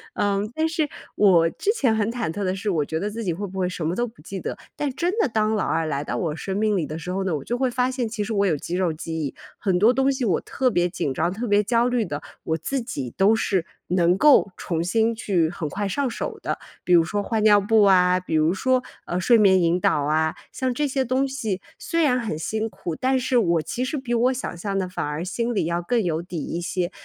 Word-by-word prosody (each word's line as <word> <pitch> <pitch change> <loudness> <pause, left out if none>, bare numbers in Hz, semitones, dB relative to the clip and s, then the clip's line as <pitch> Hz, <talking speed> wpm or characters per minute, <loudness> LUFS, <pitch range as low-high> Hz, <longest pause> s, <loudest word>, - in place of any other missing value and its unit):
嗯， 205 +2 0
但 320 0 +1
是 320 -3 -1 0.3
我 175 -5 +5
之 415 - 0
前 250 - +2
很 220 +1 0
忐 235 -7 -2
忑 200 +5 -3
的 185 -1 0
是， 200 +2 -3
我 165 -6 +1
觉 160 +2 -3
得 205 +4 -2
自 225 +2 -5
己 175 - 0
会 200 +5 -4
不 190 +1 -9
会 180 -1 0
什 180 -3 -4
么 175 - -1
都 240 - 0
不 225 -8 -13
记 195 +5 -7
得， - - -5 0.2
但 290 -3 -2
真 345 +7 -1
的 300 - +3
当 215 0 +1
老 210 - 0
2 165 0 0
来 145 -2 -2
到 - - -3
我 160 -4 -2
生 190 +4 -4
命 215 0 +2
里 175 -5 0
的 155 +2 -6
时 170 +3 -7
候 190 +1 -1
呢， 185 - -1
我 - - -7
就 240 - -2
会 260 0 +1
发 250 +1 +1
现 255 -2 -2
其 215 -1 -4
实 220 - -3
我 200 -1 +2
有 160 -5 +2
肌 170 +5 -4
肉 180 -2 +1
记 160 +1 -6
忆， 145 -4 -3 0.2
很 185 -3 0
多 225 +5 +5
东 270 +1 +2
西 265 -2 -2
我 185 -7 +1
特 260 -1 0
别 175 -6 +1
紧 145 -5 -2
张、 165 +6 0
特 230 +5 -4
别 205 0 +3
焦 235 +3 +2
虑 245 -2 +1
的， 150 -7 -4 0.2
我 160 - -1
自 270 +8 -2
己 135 - -5
都 200 +3 +4
是 195 -6 0 0.2
能 180 0 +3
够 280 -8 +5
重 165 -2 -2
新 225 +5 +1
去 180 -7 +1
很 160 -3 -4
快 200 +5 -2
上 270 +6 -1
手 - - -4
的。 - - -2 0.3
比 180 - +2
如 170 -1 +7
说 205 +5 -2
换 220 0 -1
尿 210 -1 +7
布 215 +2 +3
啊， 180 -2 +5
比 185 - -6
如 155 +2 +3
说， 255 +5 +1 0.2
呃， 175 - -2
睡 235 +5 +5
眠 190 -3 +5
引 170 +1 +2
导 150 - +2
啊， 155 +2 +1 0.2
像 260 -1 -1
这 295 +3 0
些 265 0 0
东 260 +3 +1
西 225 -8 -3 0.2
虽 335 -1 -1
然 255 -4 +3
很 220 -10 -3
辛 220 +6 -2
苦， 185 -5 -5
但 260 +5 +1
是 255 0 +1
我 170 -7 +3
其 250 +10 -3
实 280 +4 -2
比 255 -3 -3
我 245 +2 +3
想 255 - -5
象 195 +2 -3
的 190 -1 -1
反 180 - -3
而 150 +3 -3
心 235 +5 -2
里 200 - 0
要 170 +1 -1
更 230 +6 +1
有 165 -2 -1
底 175 -1 -7
一 170 - -4
些。 175 +1 -2
200 Hz, 285 characters per minute, -23 LUFS, 175-240 Hz, 0.3 s, 如